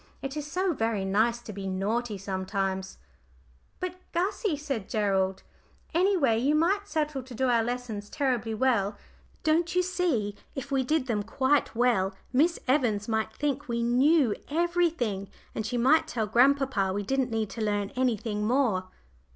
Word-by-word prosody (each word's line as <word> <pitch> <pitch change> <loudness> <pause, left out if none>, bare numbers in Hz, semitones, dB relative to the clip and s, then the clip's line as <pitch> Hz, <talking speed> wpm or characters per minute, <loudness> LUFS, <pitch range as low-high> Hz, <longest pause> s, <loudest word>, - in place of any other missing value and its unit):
"It 270 +1 -4
is 300 -1 -5
so 370 -1 +1
very 225 -6 -1
nice 220 +5 +2
to 215 - -8
be 195 0 -5
naughty 210 +4 -1
sometimes." 190 0 -3 0.8
"But, 365 0 -4 0.2
Gussie," 370 0 0
said 275 -9 -4
Gerald, 195 -3 0 0.5
"any 380 +3 +3
way, 230 -8 +3
you 280 +5 +2
might 390 +6 +2
settle 300 -6 -1
to 255 -1 -11
do 260 +2 +1
our 235 -2 +3
lessons 230 -4 -4
terribly 245 -6 -1
well. 215 -4 +1 0.5
Don't 330 +2 +2
you 360 - +4
see, 325 - 0 0.2
if 270 +1 -6
we 270 -1 +2
did 300 +1 +1
them 225 -5 0
quite 260 +7 +1
well 210 -6 +2 0.2
Miss 325 +6 +3
Evans 240 -7 +2
might 220 -1 0
think 285 +3 -2
we 235 -1 -1
knew 255 +1 +4 0.2
everything, 320 - 0 0.2
and 220 - -3
she 245 - -2
might 270 +7 +4
tell 225 -3 -1
grandpapa 250 -3 +3
we 205 +2 -2
didn't 265 +4 0
need 220 -3 -2
to 230 - -5
learn 205 -2 0
anything 225 -4 -1
more." 235 -7 +2
245 Hz, 160 wpm, -28 LUFS, 210-290 Hz, 0.8 s, you